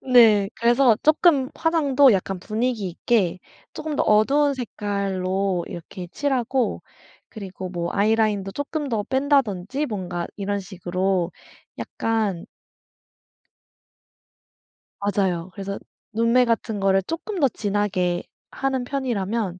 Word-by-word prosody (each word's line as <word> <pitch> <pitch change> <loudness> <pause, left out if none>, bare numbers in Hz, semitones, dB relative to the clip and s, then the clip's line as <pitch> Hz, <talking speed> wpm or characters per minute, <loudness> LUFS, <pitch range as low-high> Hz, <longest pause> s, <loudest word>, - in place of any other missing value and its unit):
네. 215 -5 +7
그래서 240 0 +4
조금 300 -3 +4
화장도 285 -6 +4
약간 190 -1 -1
분위기있게 215 -3 0 0.4
조금 310 -2 -4
더 - - +2
어두운 275 +7 +3
색깔로 195 -5 -2
이렇게 175 +1 -8
칠하고 260 -3 0 0.5
그리고 190 -3 -7
뭐 170 -1 -3
아이라인도 210 -2 +1
조금 285 0 -3
더 220 -4 0
뺀다든지 265 -2 0
뭔가 185 -7 -4
이런 200 0 -2
식으로 185 -1 -2 0.5
약간 215 -6 -2 2.5
맞아요. 190 -3 -1
그래서 200 0 -5 0.4
눈매 230 +3 +3
같은 225 -2 -1
거를 195 0 +3
조금 335 - -4
더 280 - +5
진하게 200 -5 -1 0.3
하는 265 -2 -1
편이라면 230 -7 -2
210 Hz, 245 characters per minute, -23 LUFS, 190-260 Hz, 2.5 s, 네